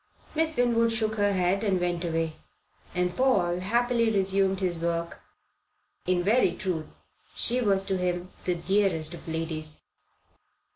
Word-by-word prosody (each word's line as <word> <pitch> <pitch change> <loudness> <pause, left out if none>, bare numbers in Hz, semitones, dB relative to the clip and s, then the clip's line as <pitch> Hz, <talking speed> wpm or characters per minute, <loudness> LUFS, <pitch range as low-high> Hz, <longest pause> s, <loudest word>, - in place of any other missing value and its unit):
Miss 320 0 0
Winwood 230 -1 +3
shook 220 -1 0
her 205 0 +3
head 185 +2 +1
and 195 -4 +2
went 175 0 -1
away, 165 -2 -1 0.6
and 180 0 0
Paul 185 -10 +2
happily 235 +4 +2
resumed 195 -2 +2
his 180 -3 -1
work. 170 0 -2 0.9
In 180 -1 +2
very 210 -2 +3
truth 175 -6 -4 0.4
she 245 +2 +1
was 195 -4 +2
to 190 -1 -1
him 180 0 -1 0.2
the 180 - +1
dearest 175 -3 0
of 170 - -10
ladies. 160 -1 -3
185 Hz, 140 wpm, -27 LUFS, 175-215 Hz, 0.9 s, Winwood